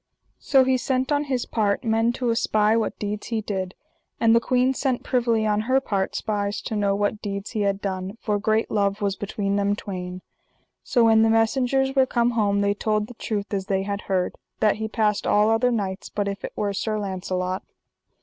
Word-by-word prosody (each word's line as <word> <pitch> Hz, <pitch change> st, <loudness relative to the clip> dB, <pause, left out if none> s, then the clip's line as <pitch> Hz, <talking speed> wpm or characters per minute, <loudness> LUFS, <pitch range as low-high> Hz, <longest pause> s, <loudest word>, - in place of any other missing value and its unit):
So 270 Hz, -2 st, +4 dB
he 260 Hz, 0 st, +2 dB
sent 260 Hz, +2 st, -1 dB
on 290 Hz, 0 st, +1 dB
his 260 Hz, -3 st, -1 dB
part 210 Hz, -1 st, 0 dB
men 225 Hz, 0 st, +2 dB
to 245 Hz, -1 st, -1 dB
espy 215 Hz, -1 st, +2 dB
what 230 Hz, -, -1 dB
deeds 210 Hz, 0 st, -4 dB
he 225 Hz, -2 st, -1 dB
did. 190 Hz, -3 st, -4 dB, 0.4 s
And 230 Hz, 0 st, +5 dB
the -, -, +6 dB
queen 255 Hz, +2 st, +2 dB
sent 265 Hz, -2 st, -1 dB
privily 235 Hz, -3 st, +1 dB
on 210 Hz, 0 st, +1 dB
her 265 Hz, +1 st, +5 dB
part 195 Hz, -7 st, -2 dB
spies 205 Hz, -1 st, -2 dB
to 220 Hz, -, -4 dB
know 200 Hz, -1 st, +1 dB
what 205 Hz, +1 st, -1 dB
deeds 200 Hz, -1 st, -4 dB
he 220 Hz, -, -2 dB
had 200 Hz, -1 st, +1 dB
done, 190 Hz, +1 st, -4 dB
for 210 Hz, -2 st, -1 dB
great 220 Hz, +2 st, +1 dB
love 200 Hz, -1 st, +1 dB
was 200 Hz, -1 st, 0 dB
between 200 Hz, 0 st, -2 dB
them 200 Hz, 0 st, +1 dB
twain. 180 Hz, -2 st, -6 dB, 0.6 s
So 240 Hz, -, +2 dB
when 225 Hz, -1 st, +5 dB
the 225 Hz, -, +4 dB
messengers 255 Hz, +4 st, +2 dB
were 265 Hz, -1 st, +4 dB
come 240 Hz, 0 st, +2 dB
home 205 Hz, -3 st, +1 dB
they 200 Hz, 0 st, +2 dB
told 215 Hz, 0 st, 0 dB
the 245 Hz, -, -11 dB
truth 215 Hz, -2 st, -4 dB
as 195 Hz, -1 st, -2 dB
they 195 Hz, -1 st, 0 dB
had 200 Hz, +1 st, -3 dB
heard, 185 Hz, -2 st, +1 dB, 0.3 s
that 215 Hz, -1 st, +3 dB
he 220 Hz, 0 st, -3 dB
passed 215 Hz, -2 st, 0 dB
all 210 Hz, +1 st, +4 dB
other 235 Hz, +3 st, +3 dB
knights 200 Hz, -5 st, -3 dB
but 205 Hz, -1 st, -2 dB
if 200 Hz, 0 st, -4 dB
it -, -, -5 dB
were 205 Hz, -1 st, -1 dB
Sir 215 Hz, +2 st, -1 dB
Launcelot. 185 Hz, -2 st, -3 dB
210 Hz, 205 wpm, -24 LUFS, 200-230 Hz, 0.6 s, the